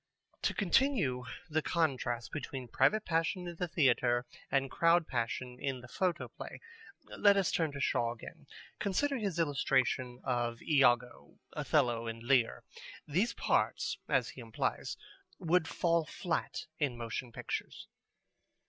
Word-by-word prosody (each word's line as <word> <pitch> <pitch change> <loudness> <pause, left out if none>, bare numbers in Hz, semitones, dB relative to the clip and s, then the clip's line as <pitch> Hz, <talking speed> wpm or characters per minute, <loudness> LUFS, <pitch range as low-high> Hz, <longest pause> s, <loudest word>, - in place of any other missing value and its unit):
To - - 0
continue 190 - +2 0.2
the 160 -1 0
contrast 130 -9 0
between 135 -4 -5
private 215 - +2
passion 170 +2 0
in 170 -1 -7
the 180 - -1
theatre 125 -6 +2 0.2
and 135 -1 +1
crowd 165 0 +4
passion 125 +1 -3
in 135 -3 -2
the 125 - -11
photoplay, 175 +5 -3 0.6
let 200 -1 +5
us 195 - +2
turn 160 -3 +1
to 140 - -5
Shaw 120 -4 +1
again. 120 - -12 0.3
Consider 235 +8 +1
his 200 -6 -2
illustration 130 -5 +1
of 120 -2 -1
Iago, 125 -5 +2 0.2
Othello, 115 -1 +1
and 115 0 -5
Lear. 125 -2 +2 0.4
These 185 +11 +1
parts, - - 0
as - - +2
he - - -9
implies, - - -2 0.4
would 175 -2 +2
fall 170 -1 +2
flat 170 +1 -3
in 140 -6 0
motion 120 +1 -4
pictures. - - -5
140 Hz, 130 wpm, -33 LUFS, 125-175 Hz, 0.6 s, let